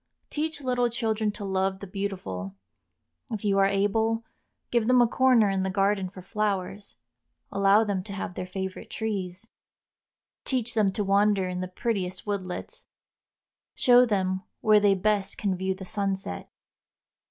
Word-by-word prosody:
Teach 310 0 -2
little 250 -2 +1
children 220 -2 -1
to 205 -1 -6
love 190 0 0
the 200 - -7
beautiful. 180 - -4 0.7
If 215 -1 -4
you 195 -1 +3
are 195 - +5
able, 220 +3 +1 0.5
give 235 -2 +2
them 250 0 +5
a 240 - +7
corner 250 -3 +4
in 195 -1 0
the 190 - -1
garden 195 0 +1
for 185 -1 -11
flowers, 200 -1 -2 0.6
allow 200 +2 +4
them 200 -3 -1
to 200 - -7
have 195 -2 -4
their 180 0 -5
favorite 190 0 -5
trees. 200 -2 -4 1.0
Teach 245 -2 -1
them 210 -4 +3
to 210 - -1
wander 200 -1 +3
in 180 0 -3
the 185 - -3
prettiest 185 -2 -3
woodlets, 190 -3 -5 0.9
show 245 0 +6
them 190 -3 0 0.2
where 215 -1 +6
they 205 -1 +4
best 205 0 0
can 195 -3 0
view 190 +1 -1
the 190 0 -9
sunset. 195 - -3
200 Hz, 155 wpm, -27 LUFS, 190-220 Hz, 1.0 s, a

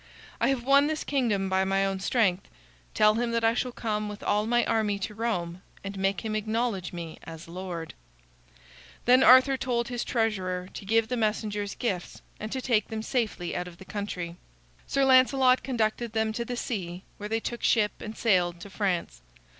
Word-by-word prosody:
I - - +2
have 270 -3 0
won 280 +2 +5
this 310 0 -2
kingdom 230 -9 0
by 190 0 +2
my 195 0 +1
own 195 -1 -2
strength. 195 -3 +1 0.5
Tell 215 0 +5
him 235 +2 0
that 230 0 0
I 225 0 +4
shall 250 +1 -1
come 215 -3 -2
with 210 0 -8
all 210 +1 +1
my 240 +1 +3
army 215 -3 +1
to 200 +2 -4
Rome 185 -6 -2 0.2
and 195 0 -5
make 195 0 0
him 220 -1 -3
acknowledge 215 -3 -1
me 170 -2 -7
as 165 0 -9
lord." 175 -1 -6 1.1
Then 250 +2 +6
Arthur 260 +1 +7
told 240 -2 -1
his 245 -1 -2
treasurer 185 -6 -1
to - - -8
give 225 +2 +2
the 250 - -2
messengers 210 -2 -1
gifts, 190 -7 -3 0.2
and 215 +1 -5
to 260 - -2
take 220 -5 +2
them 220 0 -4
safely 220 -8 -2
out 180 0 -3
of 175 -1 -11
the 190 - -12
country. 180 -4 -5 0.5
Sir 275 -1 +2
Lancelot 260 0 +5
conducted 230 -2 -1
them 220 -1 0
to 235 +1 -3
the 245 +1 -4
sea, 185 -7 -4
where 210 0 -6
they 225 +1 0
took 240 +1 -5
ship 210 -3 +3
and 215 0 -7
sailed 175 -6 +2
to 200 - -10
France. 180 - -2
215 Hz, 190 wpm, -27 LUFS, 190-235 Hz, 1.1 s, Arthur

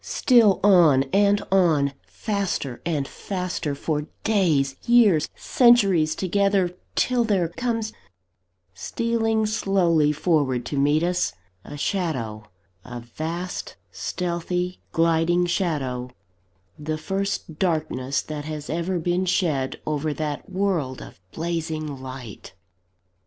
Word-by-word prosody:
Still 230 -7 +4
on 170 -9 +6
and 205 0 +3
on; 160 -7 +3
faster 195 - -3
and 145 -5 -1
faster, 180 -6 -4
for 150 +1 -2 0.2
days, 160 -11 +2
years, 220 -10 +5
centuries 195 -11 +4
together, 195 -1 +1 0.2
till 250 -1 +2
there 195 -7 +1
comes, 225 +2 -2 0.8
stealing 225 - 0
slowly 180 -8 +2
forward 145 -6 0
to 145 - -4
meet 145 +3 +3
us, 180 +1 0 0.3
a 145 - -9
shadow 130 - -2 0.4
a 120 -1 -8
vast, 165 +9 -5 0.2
stealthy, 180 0 -3
gliding 165 +2 +2
shadow 145 -9 -1 0.7
the 155 +1 -3
first 195 -1 -3
darkness 140 -7 -1
that 150 -1 -6
has 155 -1 -5
ever 170 +3 -1
been 175 +2 0
shed 155 -8 0
over 150 0 -1
that 150 -1 -4
world 185 -9 -1
of - - -12
blazing 160 -4 -3
light! 130 -5 -9
170 Hz, 110 wpm, -24 LUFS, 145-195 Hz, 0.8 s, on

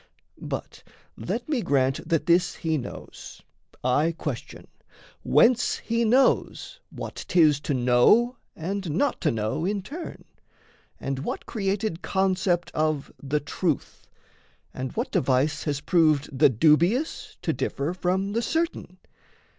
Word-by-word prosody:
But - - -6 0.3
let - - -4
me 290 -6 0
grant 135 -1 0
That 165 -3 +1
this 175 0 +3
he 160 -1 -1
knows, 130 -5 -8 0.4
I 145 +7 +2
question: 140 -7 -6 0.6
whence 230 - +3
he 230 0 -1
knows 265 - +2
What - - -7
'tis 155 -5 +4
to 145 -1 -2
know 125 - +4 0.2
and 190 +2 -4
not 245 - 0
to 155 - +2
know 110 +5 -2
in 200 +1 -1
turn, 325 - -8 0.7
And 135 -1 -3
what 140 - -4
created 195 -3 -2
concept 185 -2 0
of 155 -2 -1
the 145 +2 -1
truth, 150 +1 -3 0.7
And 130 0 -4
what 245 +4 -3
device 135 +3 +1
has 145 -2 -1
proved 155 -5 +2
the 140 +2 +6
dubious 165 - +2
To - - 0
differ 145 +5 -2
from 185 +2 -1
the 230 - +1
certain? 320 - -2
165 Hz, 130 wpm, -25 LUFS, 145-200 Hz, 0.7 s, the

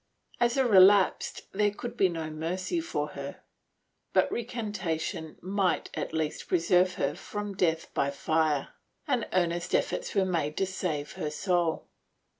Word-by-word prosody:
As 240 +2 +2
a 265 - +4
relapsed 195 -2 +5
there 205 +1 +2
could 235 +3 -7
be 190 -5 +3
no 160 -2 -4
mercy 180 - -2
for 335 - -2
her, - - -7 0.7
but - - +3
recantation 205 -9 -3
might 190 -1 0
at - - -3
least 160 -1 -2
preserve 180 +1 +3
her - - 0
from 205 -1 -5
death 165 -4 0
by 140 - +1
fire, 155 0 0 0.4
and - - 0
earnest 175 -1 +1
efforts - - -1
were 195 -1 +3
made 160 -5 -1
to 195 - +2
save 175 -6 -3
her 150 - -3
soul. 175 0 0
180 Hz, 145 wpm, -29 LUFS, 160-200 Hz, 0.7 s, relapsed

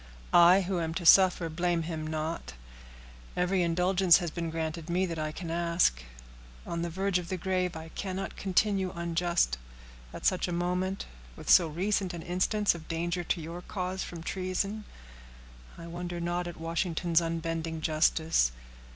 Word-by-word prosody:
"I, 175 +3 +7
who 185 -1 -1
am 160 -1 -2
to 175 - -3
suffer, 180 -1 +6
blame 170 +1 0
him 160 -1 -4
not. 155 - -4 0.8
Every 180 +1 +2
indulgence 180 +1 +4
has 175 -3 -3
been 170 0 -3
granted 160 0 -4
me 180 +2 +1
that 165 -3 -4
I 155 0 -2
can 165 +1 -6
ask. 170 - +1 0.6
On 170 0 -3
the 170 - -2
verge 190 +2 0
of 175 - -8
the 185 - -2
grave 180 -1 -1
I 160 0 -7
cannot 190 +2 -5
continue 195 0 +1
unjust. 170 - 0 0.5
At - - -8
such 185 - +2
a - - -3
moment, 180 +2 -1 0.3
with - - -2
so 175 - +7
recent 185 +3 -1
an 165 - -7
instance 185 +4 +1
of 165 -2 -10
danger 170 +2 -2
to 175 - 0
your 165 +2 -7
cause 185 0 -4
from 170 -2 -8
treason, 195 +4 -2 0.9
I 170 - -9
wonder 175 +1 -5
not 175 +1 -2
at 175 - -7
Washington's 165 0 0
unbending 165 -1 -3
justice. 155 - +2
175 Hz, 160 wpm, -29 LUFS, 165-185 Hz, 0.9 s, I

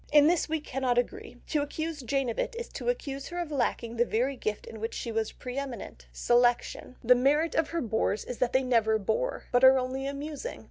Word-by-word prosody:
In 295 -1 +7
this 335 0 +2
we 320 0 0
cannot 260 -4 -1
agree, 245 0 -2
to 300 - +1
accuse 315 +1 -4
Jane 270 +1 0
of 230 - -3
it - - -1
is 475 - -5
to - - -3
accuse 275 - -3
her 350 - -6
of 345 -3 -3
lacking 235 -4 -1
the 240 - +5
very 245 +4 0
gift 215 -4 -3
in 220 - -9
which 225 +2 -4
she 235 - -4
was 220 -1 -1
pre 250 +2 -5
eminent—selection. 240 - 0
The 245 +2 +7
merit 290 +6 +2
of 320 - +1
her 335 0 -1
bores 220 -2 0
is 250 - -6
that 250 - +1
they 260 +1 +3
never 225 -3 +3
bore, 220 - -1
but 245 0 +3
are 260 0 +9
only 260 +1 -2
amusing. 295 - -5
260 Hz, 220 wpm, -29 LUFS, 235-295 Hz, -, are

